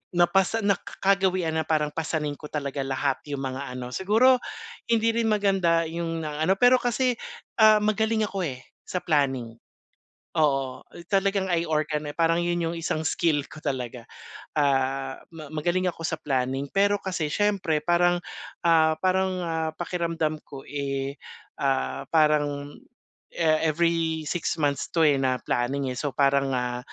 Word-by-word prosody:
Napasa 190 +5 +3
naka 200 -2 -1
kagawian 190 -3 +2
na 160 -1 -1
parang 150 -2 +1
pasanin 155 -2 -2
ko 150 - -8
talaga 140 -2 -4
lahat 135 0 -1
yung 140 -2 -4
mga 130 0 -4
ano. 125 0 -6
Siguro 225 - +4 0.5
hindi 230 0 +3
rin 230 0 0
maganda 195 -6 +2
'yong 165 0 -3
na-ano, 155 +5 0
pero 245 +4 +5
kasi, 245 +1 +1 0.5
ah, 215 -1 +7
magaling 220 +1 +1
ako, 200 -2 -3
eh, 130 -1 -7 0.2
sa 180 - -3
planning. 135 -7 +1 0.9
Oo, 135 -4 +1
uh, - - -12
talagang 195 -1 +1
I 170 -1 +1
organ 155 -1 -1
eh, 145 - -6
parang 165 0 +2
'yon 175 0 0
'yong 165 +1 -2
isang 160 -1 -2
skill 155 -1 +1
ko - - -11
talaga. 125 -5 -4 0.5
Ah, 135 -2 0
ma 165 -2 -10
magaling 175 +4 0
ako - - -14
sa 160 -1 -2
planning. 135 -2 -1
Pero 200 +1 +3
kasi 180 -6 -3
siyempre 195 -4 +1
parang, 175 0 +3 0.5
ah 160 -2 +4
parang, 190 +2 +1 0.2
ah, 160 -1 -1
pakiramdam 165 -3 -2
ko, 135 -1 -11
eh, 140 -1 -4 0.4
ah, 135 -1 0
parang 145 -2 +2 0.5
e 170 - -4
every 160 0 +1
six 160 +2 -2
months 145 -3 0
'to 165 -1 +2
eh, 145 -3 +4
na 130 -1 +1
planning, 130 +2 -1
eh. 125 - -5
So 145 -3 -3
parang, 140 -1 +2
ah, 125 0 -2
160 Hz, 155 wpm, -26 LUFS, 140-180 Hz, 0.9 s, ah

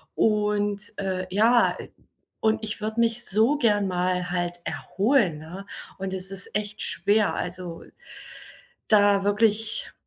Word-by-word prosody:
und, 210 -1 0
äh, 190 -2 -2
ja, 230 +4 +4
ä - - -9 0.5
und 220 0 +1
ich 210 0 -4
würde 220 +2 -3
mich 230 0 +1
so 225 +9 +3
gern 210 -6 +2
mal 180 0 -1
halt 175 -1 -2
erholen, 200 - +1
ne? 180 +5 -9 0.3
Und 190 0 -4
es 185 0 -3
ist 195 0 -5
echt 210 0 -3
schwer, 210 0 +2
also, 180 -1 -5 1.0
da 205 -2 +4
wirklich 215 +1 +1
205 Hz, 130 wpm, -25 LUFS, 185-220 Hz, 1.0 s, ja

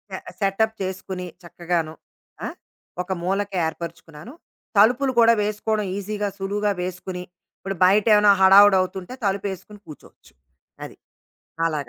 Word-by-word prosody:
ఆహ్, - - -8 0.2
సెటప్ 220 +2 0
చేసుకొని 185 -1 -5 0.2
చక్కగాను, 170 -2 -3 0.5
ఆ! - - -2 0.5
ఒక 180 +1 -7
మూలకి 195 +2 -2
ఏర్పరుచుకున్నాను. 165 - -8 0.4
తలుపులు 250 +6 +4
కూడా 230 0 +6
వేసుకోవడం 210 0 -1
ఈజీగా, 205 +1 -3
సులువుగా 205 +2 -1
వేసుకొని, 180 0 -5 0.4
ఇప్పుడు 195 0 -5
బయటేమైనా 210 +1 +5
హడావిడి 195 +1 +7
అవుతుంటే 185 +4 -5
తలుపేసుకొని 200 +1 -3
కూర్చోవచ్చు. 155 - -15 0.5
అది. - - -12 0.7
అలాగా. 150 -5 -3
195 Hz, 110 wpm, -23 LUFS, 180-210 Hz, 0.7 s, హడావిడి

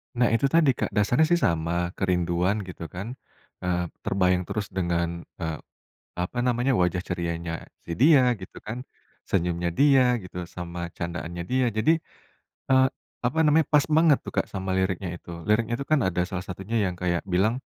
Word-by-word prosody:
Nah 120 0 +3
itu 115 +4 +3
tadi 155 -1 +4
Kak, - - -2
dasarnya 120 +9 +3
sih 175 +1 +3
sama 85 - 0
kerinduan 90 +2 +1
gitu 90 -3 -8
kan, 100 - -7 0.5
eee, 90 -1 0 0.2
terbayang 90 -1 +2
terus 105 -2 -3
dengan, 85 -2 -1 0.2
eee, 80 -2 -3 0.6
apa 90 +7 -3
namanya, 125 +2 +2
wajah 90 0 +1
cerianya, 85 -2 -3 0.2
si - - -7
dia 135 -3 +6
gitu 95 - -10
kan, 120 +5 -6 0.4
senyumnya 85 -1 0
dia 130 0 +5
gitu, 90 -1 -6
sama 90 0 -7
candaannya 85 0 -5
dia, 130 0 +3
jadi, 135 +10 +3 0.7
eee, 130 0 +6 0.4
apa 125 +6 0
namanya, 155 +1 +4
pas 150 -2 +5
banget 155 -2 +5
tuh - - -8
Kak - - +1
sama 95 -1 -4
liriknya 95 -1 -1
itu 85 - -11 0.2
liriknya 110 +2 +2
itu 140 - -5
kan 155 -2 +3
ada 90 -1 +1
salah 95 -2 -4
satunya 95 +4 -5
yang 90 - -1
kayak 85 -1 0
bilang, 100 +7 +1
95 Hz, 165 wpm, -26 LUFS, 85-125 Hz, 0.7 s, dia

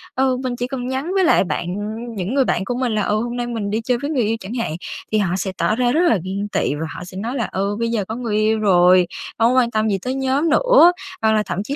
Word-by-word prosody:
ờ, 260 -1 +2
mình 250 -1 -2
chỉ 245 +1 -3
cần 255 -2 -4
nhắn 265 +7 -3
với 385 -1 +3
lại 335 - +4
bạn, 175 - -3
ừm, 220 +3 -5
những 195 +5 -3
người 270 -2 +3
bạn 190 - 0
của 245 - -2
mình 245 -3 -1
là 210 - +1
"Ờ, 210 - 0
hôm 240 +2 -2
nay 240 - -2
mình 225 -4 -3
đi 220 +2 -1
chơi 245 +1 0
với 285 - -3
người 255 -6 +1
yêu" 220 +2 0
chẳng 195 +5 -7
hạn, 230 -10 -2 0.4
thì 215 - +2
họ 190 -4 +1
sẽ 190 +1 -2
tỏ 215 - +1
ra 245 0 +1
rất 315 +6 +2
là 290 - +4
ghen 195 +2 -3
tị - - 0
và 155 +2 -4
họ - - -7
sẽ 185 +1 -10
nói 230 +6 -3
là 235 -4 -1
"Ừ, 200 +2 -1
bây 230 0 0
giờ 215 -4 -1
có 220 - -5
người 235 -4 -3
yêu 215 +1 +2
rồi 180 -3 +5 0.3
hông 230 +2 +4
có 260 - +5
quan 235 -2 +1
tâm 215 -1 +1
gì 195 - +1
tới 255 +4 -3
nhóm 270 +4 0
nữa." 355 0 +6 0.3
Hoặc 220 0 +3
là 215 -1 +2
thậm 195 - -3
chí 275 +6 -4
230 Hz, 300 wpm, -20 LUFS, 205-255 Hz, 0.4 s, nữa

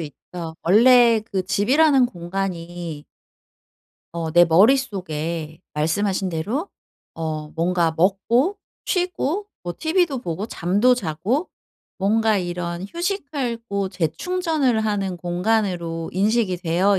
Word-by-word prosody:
있죠. 160 +2 -8
원래 235 +4 +6
그 190 -2 0
집이라는 265 - +4
공간이 175 -5 -5 1.1
어 165 -1 -3
내 175 +1 +7
머릿속에 170 - +1
말씀하신 185 +5 0
대로 215 - -2 0.5
어 155 -2 -4
뭔가 170 0 0
먹고 225 - +2 0.3
쉬고 360 0 -1 0.2
뭐 175 -1 -4
TV도 325 -3 +1
보고 185 -1 -4
잠도 205 +6 +2
자고 205 - -1 0.5
뭔가 215 +2 +2
이런 175 -1 -3
휴식하고 245 - -3
재충전을 260 - 0
하는 200 -4 -1
공간으로 175 -2 -1
인식이 205 0 +1
되어 180 +3 +2
195 Hz, 225 characters per minute, -22 LUFS, 170-245 Hz, 1.1 s, 내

